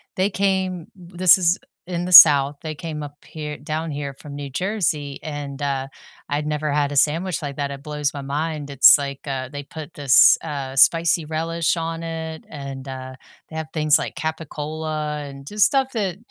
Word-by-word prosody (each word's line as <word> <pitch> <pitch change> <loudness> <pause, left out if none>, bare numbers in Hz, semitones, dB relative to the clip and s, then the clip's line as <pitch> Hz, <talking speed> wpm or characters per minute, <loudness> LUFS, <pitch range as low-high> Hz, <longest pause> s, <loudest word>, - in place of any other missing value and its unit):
they 190 +2 +1
came 190 -3 -1
this 180 0 +3
is 175 -1 +2 0.3
in 175 -1 -3
the 180 - -5
South, 145 -4 +9
they 155 -1 -6
came 155 -1 -6
up 145 -1 -8
here 150 -2 -7
down 155 +2 -4
here 145 -2 -5
from 140 +1 -11
New 140 -1 -6
Jersey, 155 -5 -2
and, 145 -2 -6
uh, 135 -2 -2 0.4
I'd 145 +1 -2
never 150 0 -2
had 145 0 0
a - - -5
sandwich 165 +5 +1
like 140 -2 -5
that, 140 0 -3
it 140 -1 -8
blows 150 -1 -2
my 140 - -6
mind, 145 +1 -4
it's 140 -1 +8
like, 140 -1 -5
uh, 130 -2 -4
they 145 0 -7
put 155 +2 -10
this, 140 -3 +6
uh, 135 -2 -5
spicy 165 +3 +4
relish 165 +2 -1
on 165 0 -4
it, 160 -1 -6
and, 140 -2 -8
uh, 130 0 -8 0.3
they 160 - -11
have 160 -1 -4
things 155 -2 +4
like - - -6
capicola 155 -1 -5
and 140 0 -12
just 210 +3 +3
stuff 270 -2 +1
that, 195 -6 -2
150 Hz, 190 wpm, -21 LUFS, 140-165 Hz, 0.4 s, South